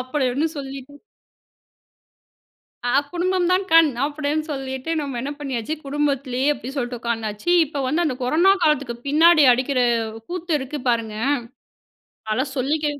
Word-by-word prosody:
அப்படி 260 +2 -1
ஒண்ணு 305 +5 0
சொல்லிட்டு 275 +1 -8 1.9
ஆ, 245 - 0 0.2
"குடும்பம் 360 0 0
தான் 370 +1 +2
கண்" 330 -2 +7 0.2
அப்படீன்னு 300 +1 -2
சொல்லிட்டு, 265 +1 -4
நம்ம 275 -4 -4
என்ன 275 +3 -4
பண்ணியாச்சு, 270 0 -3
குடும்பத்திலேயே 275 -2 -1
அப்படி 255 0 -8
சொல்லிட்டு 245 -2 -3
உட்கார்ந்தாச்சு. 225 +2 -3 0.2
இப்ப 285 -2 -4
வந்து 325 +6 +1
அந்த 260 -5 -1
கொரோனா 335 +10 +4
காலத்துக்கு 280 -6 +1
பின்னாடி 315 +1 +6
அடிக்கிற 255 +1 0 0.5
கூத்து 350 -1 -4
இருக்கு 270 +2 -5
பாருங்க, 225 -2 -2 1.1
அதெல்லாம் 260 +5 -1
சொல்லிக்க 295 +4 0
280 Hz, 130 wpm, -22 LUFS, 255-310 Hz, 1.9 s, கண்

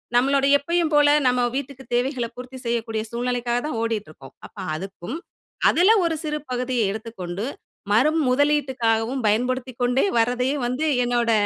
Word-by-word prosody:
நம்மளோட 275 +2 +3
எப்பயும் 335 +3 0
போல 295 0 +5 0.2
நம்ம 250 0 +2
வீட்டுக்கு 275 -1 -5
தேவைகள 250 0 0
பூர்த்தி 255 +1 -9
செய்யக்கூடிய 225 -2 -1
சூழ்நிலைக்காகத்தான் 245 +2 -1
ஓடிட்டுருக்கோம். 205 - -5
அப்ப - - -30 0.2
அதுக்கும் 195 - -6 0.5
அதுல 365 +5 +5
ஒரு 330 -1 0
சிறு 300 -1 -2
பகுதிய 250 -1 -1
எடுத்துக்கொண்டு 205 -3 -5 0.5
மறு 255 +9 +4 0.2
முதலீட்டுக்காகவும் 255 -3 +1
பயன்படுத்திக்கொண்டே 250 - +1
வர்றதையே 250 +4 +1
வந்து 255 +6 -1 0.2
என்னோட 240 -1 +1
245 Hz, 120 wpm, -23 LUFS, 230-275 Hz, 0.5 s, போல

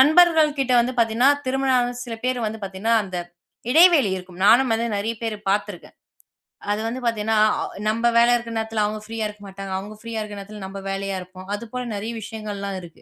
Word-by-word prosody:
நண்பர்கள் 315 0 +5
கிட்ட 255 -1 +1
வந்து 250 +2 -1
பாத்தீங்கன்னா, 230 +4 +4 0.2
திருமணம் 265 0 +2
ஆன 245 0 0
சில 230 -2 -6
பேர் 255 -1 0
வந்து 220 0 -5
பாத்தீங்கன்னா, 195 +4 0
அந்த 185 -2 -6 0.6
இடைவெளி 320 - +6
இருக்கும். 180 0 -10
நானும் 240 +1 +6
வந்து 235 +1 -1
நிறைய 225 +3 -2
பேர் 220 -2 -2
பாத்துருக்கேன். 200 -3 -3 0.8
அது 210 - 0
வந்து 240 +3 -3
பாத்தீங்கன்னா 220 -1 0 0.2
ஆ - - -1 0.2
நம்ம 230 +2 0
வேலை 235 +1 +6
இருக்கற 235 -1 -4
நேரத்துல 220 -1 -1
அவங்க 215 0 -4
ப்ரீயா 225 0 -3
இருக்க 210 0 -11
மாட்டாங்க. 195 0 -8
அவங்க 205 +3 -7
ப்ரீயா 230 -1 -4
இருக்க 210 -1 -6
நேரத்துல 205 +1 -9
நம்ம 195 +1 -6
வேலையா 195 0 -2
இருப்போம். 185 +1 -11
அது 205 - -4
போல 250 0 -3
நிறைய 210 +3 -4
விஷயங்கள்லாம் 205 -2 -5
இருக்கு. 170 -2 -14
220 Hz, 195 wpm, -23 LUFS, 200-245 Hz, 0.8 s, இடைவெளி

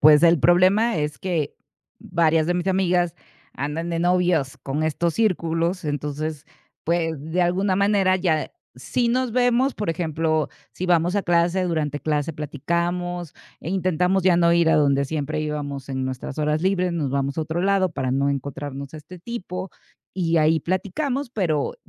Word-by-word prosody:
pues 150 +1 +7
el 170 -1 +6
problema 185 - +4
es 150 -1 -2
que 165 -6 -2 0.4
varias 160 -1 +1
de 175 - +1
mis 180 +2 -1
amigas 180 -2 +1 0.4
andan 150 +5 -3
de 165 - -1
novios 175 -5 +1
con 145 +3 -2
estos 160 +1 0
círculos. 175 -4 0
Entonces 150 +1 -3 0.4
pues 165 -1 0 0.2
de 180 +1 +2
alguna 185 +2 +1
manera 200 -1 +3
ya 165 -4 0 0.3
Sí, 245 -2 -1
nos 250 0 0
vemos, 245 +2 +2
por 210 -5 -2
ejemplo, 160 -2 0 0.2
si 185 - -5
vamos 175 +2 +2
a 200 - +1
clase 175 +2 +2
durante 155 -4 -1
clase 150 +1 -1
platicamos 170 +4 -3 0.3
e 165 - -6
intentamos 185 0 +1
ya 180 -2 +4
no 170 -1 +4
ir 170 -1 +4
a - - +4
donde 140 -2 +3
siempre 155 +1 -3
íbamos 145 -3 -4
en 130 -1 -2
nuestras 130 +2 -5
horas 150 +1 0
libres. 185 -2 +1
Nos 150 -6 -1
vamos 140 +1 -1
a - - +2
otro 160 +2 -2
lado 195 -1 +2
para 130 -5 -2
no 140 +1 +1
encontrarnos 140 +1 -5
a 155 - -6
este 175 +4 -12
tipo 190 -3 -6 0.4
y 170 -3 0
ahí 155 0 +3
platicamos, 250 - -2
pero 165 - -1
170 Hz, 165 wpm, -23 LUFS, 150-185 Hz, 0.4 s, pues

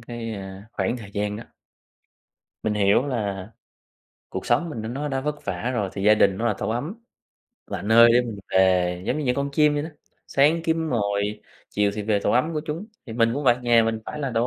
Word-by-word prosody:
cái, 115 -1 -6
ơ, 95 -1 -8
khoảng 120 - -1
thời 105 -5 -10
gian 105 0 -2
đó. 115 - -8 1.2
Mình 110 -1 0
hiểu 105 +6 +3
là 100 -7 -3 0.8
cuộc 95 0 -6
sống 160 +8 +1
mình 115 -7 -5
nó 110 - -5
nó 140 +5 -3
đã 135 -2 -1
vất 150 +1 -4
vả 125 - -2
rồi 100 -4 -1
thì 100 - -5
gia 105 +1 +6
đình 100 -2 +3
nó 120 - 0
là 105 - +1
tổ - - -2
ấm, 140 - -3 0.7
là - - -5
nơi 115 +3 +7
để 120 - +5
mình 115 -4 -6
về. 90 -1 +3
Giống 145 - 0
như 150 - -2
những 125 - +1
con 140 +1 -2
chim 150 0 +4
vậy 145 - -1
đó, 160 - -5 0.4
sáng 155 +4 +3
kiếm 160 -1 0
mồi, 100 -2 -1 0.3
chiều 105 0 +1
thì 105 - -3
về 105 0 +1
tổ - - 0
ấm 150 +7 +2
của 155 - -1
chúng. 165 +7 -4 0.2
Thì 115 - -7
mình 115 0 +2
cũng 145 +2 -3
vậy, 120 -2 +5
nhà 120 -1 +5
mình 110 0 -1
phải 150 - -6
là 135 -3 -2
tổ 115 +2 +2
115 Hz, 230 wpm, -24 LUFS, 105-140 Hz, 1.2 s, nơi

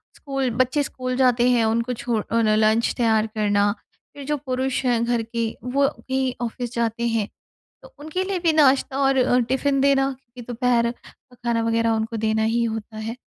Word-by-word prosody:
School 270 -3 -2
बच्चे 260 +4 -1
school 255 -2 -4
जाते 250 -2 +3
हैं 240 -2 +3
उनको 230 +3 0
छोड़ 230 -2 -2
अ, - - 0
उन्हें 215 -2 +3
लंच 220 +1 +2
तैयार 225 -3 +2
करना 205 -1 +2 0.4
फिर 285 -1 -9
जो 295 +1 -1
पुरुष 265 -1 -2
हैं 240 -2 +2
घर 240 -1 0
के 230 0 -2 0.2
वो 275 +3 +1 0.2
भी 260 -1 -1
ऑफिस 240 0 -4
जाते 235 0 -1
हैं 225 -3 -1 0.5
तो - - -14
उनके 315 +5 -3
लिए 380 -1 -2
भी 335 -2 +2
नाश्ता 275 -3 +3
और 270 -1 +2
अ, 250 -1 +3
टिफिन 275 +1 +1
देना 275 0 +3
क्योंकि 250 -2 -14
दोपहर 240 -1 +2
का 250 +1 -21
खाना 235 -1 -1
वगैरह 230 0 +1
उनको 225 +1 -1
देना 220 0 0
ही 225 +2 +1
होता 220 -1 -5
है। 220 +1 -4
240 Hz, 190 wpm, -23 LUFS, 225-265 Hz, 0.5 s, जाते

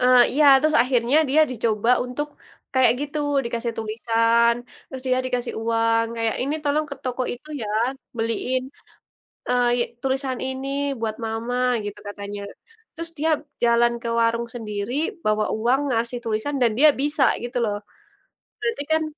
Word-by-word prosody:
Eee, 250 0 +6
iya, 300 +3 +3 0.2
terus 310 +1 +3
akhirnya 250 +1 +2
dia 300 +4 +4
dicoba 230 -2 0
untuk 275 +4 -4 0.5
kayak 260 -1 +5
gitu, 290 +1 -3 0.3
dikasih 235 0 -2
tulisan, 230 +1 +2 0.3
terus 260 -1 -8
dia 255 0 +2
dikasih 250 -1 -2
uang, 230 0 +2
kayak, 225 -1 0
"Ini 280 +3 -1
tolong 300 +1 +1
ke - - -4
toko 255 0 -2
itu 245 +5 -11
ya, 210 - -4 0.5
beliin, 230 +3 -1 0.9
eee, 245 0 +3
ye 240 - +2 0.2
tulisan 265 -1 -1
ini 265 +1 -4 0.3
buat 220 -1 -2
mama." 225 +2 -3 0.3
Gitu 205 0 -6
katanya. 205 0 -6 0.5
Terus 335 0 -6
dia 320 +2 +1 0.3
jalan 235 0 +4
ke 235 - -3
warung 230 +1 +1
sendiri 210 -1 -4 0.3
bawa 215 0 +2
uang 240 +5 +2
ngasih 235 +1 -1
tulisan, 225 +6 -2
dan 235 - +4
dia 305 +3 +8
bisa 290 0 +2 0.2
gitu 245 +1 -6
loh. 205 -2 -1 0.8
Berarti 460 -9 -2
kan 315 0 +3
240 Hz, 150 wpm, -23 LUFS, 230-265 Hz, 0.9 s, dia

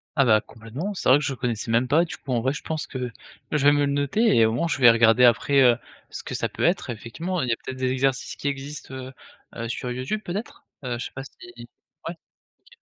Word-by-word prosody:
Ah 135 -3 +4
bah, 110 -3 +5
complètement. 120 - -6
C'est - - -4
vrai 130 - +8
que - - -5
je 140 - -1
connaissais 120 -3 -3
même 120 +2 +2
pas. 160 +5 +4
Du 175 - -6
coup, 135 - -8
en 120 - +1
vrai, 130 +3 +1
je 150 - -7
pense 155 -2 -3
que - - -7 0.5
que 150 - +2
je 140 - -1
vais 145 - +8
me 145 0 +3
le 140 - -1
noter 145 - +2
et 115 -1 +6
au 110 - +2
moins, 125 +8 0
je - - -1
vais 125 -3 +8
regarder 115 +1 +5
après, 125 +3 +5
heu, 120 -2 +6 0.3
ce - - -7
que - - -5
ça - - -1
peut - - -5
être. 175 -4 +1
Effectivement, 160 - -4
il 125 - -2
y - - +2
a - - -1
peut-être 130 - -6
des 130 0 0
exercices 130 0 0
qui - - -5
existent, 140 0 -5
heu-heu, 130 -3 -9
sur 125 +1 -4
YouTube, 130 +12 -3
peut-être? 195 +4 -6 0.2
Heu, 125 -2 -3
je - - -4
sais - - -7
pas 135 - -6
si 135 - -13 0.8
ouais. - - -4 0.4
OK. 485 - -22
130 Hz, 260 wpm, -24 LUFS, 120-145 Hz, 0.8 s, vrai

